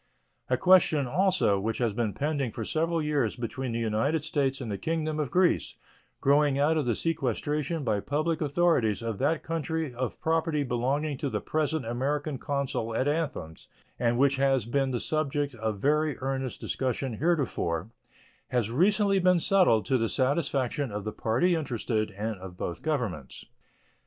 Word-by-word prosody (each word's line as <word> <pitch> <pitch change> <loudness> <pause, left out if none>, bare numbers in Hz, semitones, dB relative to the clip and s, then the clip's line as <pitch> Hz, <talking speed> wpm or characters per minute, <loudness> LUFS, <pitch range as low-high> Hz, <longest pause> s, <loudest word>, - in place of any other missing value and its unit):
A - - +2
question, 175 -6 +5
also, 180 - +2
which 110 +3 -2
has 120 -4 0
been 110 -2 -1
pending 145 -4 -1
for 110 - -5
several 165 +3 0
years 150 -2 0
between 125 +1 -4
the 115 - -2
United 115 +8 0
States 140 -3 0
and 120 -5 -5
the 100 - -2
Kingdom 155 -1 -1
of 145 -4 -1
Greece, 180 -1 +2 0.5
growing 140 0 +3
out 150 +3 +3
of 150 -5 0
the 120 - +2
sequestration 150 +1 -1
by 110 -5 +1
public 155 +7 -1
authorities 145 - +2
of 115 -3 -3
that 150 +4 +1
country 160 -3 -2
of 125 -1 -4
property 160 -2 +1
belonging 135 +3 -1
to 140 - -1
the - - -2
present 155 -3 -1
American 140 +4 -2
consul 135 -5 -2
at 130 - +1
Athens, 145 - -3 0.3
and 120 0 +1
which 140 +1 +3
had 135 -4 +1
been 135 0 +2
the 125 -2 -1
subject 145 -1 -1
of 110 -2 -3
very 150 +5 +1
earnest 135 -1 -3
discussion 130 -2 -2
heretofore, 115 - 0 0.6
has 120 -3 0
recently 195 - +3
been 180 -1 +4
settled 180 - +3
to 130 -2 +2
the 115 -1 0
satisfaction 140 -1 0
of 105 0 -4
the 110 - -3
party 120 +11 +1
interested 120 -8 -1
and 110 0 -3
of 90 -1 -9
both 85 -1 -4
Governments. 120 - -3
140 Hz, 165 wpm, -28 LUFS, 115-155 Hz, 0.6 s, question